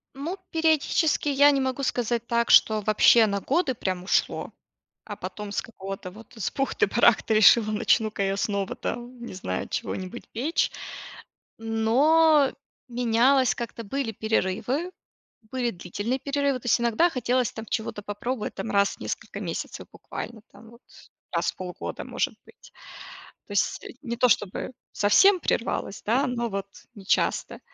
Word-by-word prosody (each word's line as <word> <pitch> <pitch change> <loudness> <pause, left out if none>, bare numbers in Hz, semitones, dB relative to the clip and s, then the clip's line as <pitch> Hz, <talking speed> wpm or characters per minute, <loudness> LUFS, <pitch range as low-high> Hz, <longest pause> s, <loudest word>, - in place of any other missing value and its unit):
Ну, 320 +8 -4
периодически 320 -2 +2
я 285 +1 +6
не 275 -1 +1
могу 265 +1 -2
сказать 235 -2 -1
так, 235 0 +1
что 215 -1 +6
вообще 215 +2 +5
на 200 -1 -1
годы 285 - 0
прям 185 -4 -3
ушло, 185 - 0 0.5
а - - -6
потом 210 -1 -7
с - - 0
какого-то 195 -4 -8
вот, 225 +5 -15
с 220 - -2
бухты-барахты 235 -4 +2
решила: 215 +1 +6
начну-ка 215 -1 +1
я 195 0 0
снова, 200 -1 -2
там, 240 +1 -6
не - - -8
знаю, 95 - -4
чего-нибудь 185 +5 -5
печь. 275 +9 0 0.9
Но 275 +7 +3 0.4
менялось 245 +1 +3
как-то, 235 -1 -6
были 245 +2 -3
перерывы. 220 - -1 0.6
Были 250 -2 0
длительные 205 +7 -3
перерывы. 280 -1 0
То - - -11
есть 240 - +3
иногда 235 +8 +3
хотелось, 250 -3 0
там, 220 0 -8
чего-то 220 -2 -3
попробовать, 210 +3 -4
там, 220 - -5
раз 200 -1 +2
в - - -30
несколько - - -5
месяцев, - - -5
буквально, 230 -2 -8
там, 225 - -15
вот 235 +1 -18 0.5
раз - - 0
в - - -28
полгода, 180 -1 -6
может - - -2
быть. - - -18 0.7
То - - -10
есть 200 - 0 0.2
не 235 -4 -4
то 250 +1 +4
чтобы 205 +2 0 0.2
совсем 370 - +5
прервалось, 230 -7 -2
да, 240 +6 +2
но 240 -2 -2
вот 195 -1 -3 0.3
не 200 -4 -13
часто. - - 0
235 Hz, 150 wpm, -26 LUFS, 210-260 Hz, 0.9 s, я